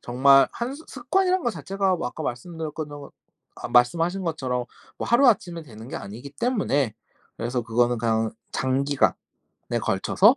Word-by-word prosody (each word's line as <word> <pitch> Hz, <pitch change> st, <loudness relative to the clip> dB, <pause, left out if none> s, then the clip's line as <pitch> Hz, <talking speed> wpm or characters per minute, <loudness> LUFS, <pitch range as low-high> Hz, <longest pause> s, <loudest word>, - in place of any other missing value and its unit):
정말 135 Hz, +3 st, +5 dB
한 245 Hz, +3 st, -3 dB
습 315 Hz, +2 st, -13 dB
습관이란 365 Hz, +9 st, +1 dB
거 240 Hz, -, +1 dB
자체가 195 Hz, -3 st, 0 dB
뭐 170 Hz, -, -3 dB
아까 -, -, -7 dB
말씀드렸던 155 Hz, +4 st, -4 dB
것 145 Hz, -1 st, -10 dB, 0.4 s
아 -, -, -6 dB
말씀하신 165 Hz, +10 st, +3 dB
것처럼 130 Hz, -6 st, -1 dB, 0.3 s
뭐 -, -, -4 dB
하루아침에 220 Hz, -9 st, +3 dB
되는 115 Hz, -5 st, -11 dB
게 -, -, -8 dB
아니기 115 Hz, +8 st, -7 dB
때문에 145 Hz, -, +1 dB, 0.4 s
그래서 120 Hz, +2 st, -1 dB
그거는 120 Hz, +1 st, +1 dB
그냥 110 Hz, -1 st, +1 dB, 0.2 s
'장기간에 135 Hz, +2 st, +1 dB, 0.7 s
걸쳐서 -, -, +4 dB
145 Hz, 340 characters per minute, -25 LUFS, 120-195 Hz, 0.7 s, 정말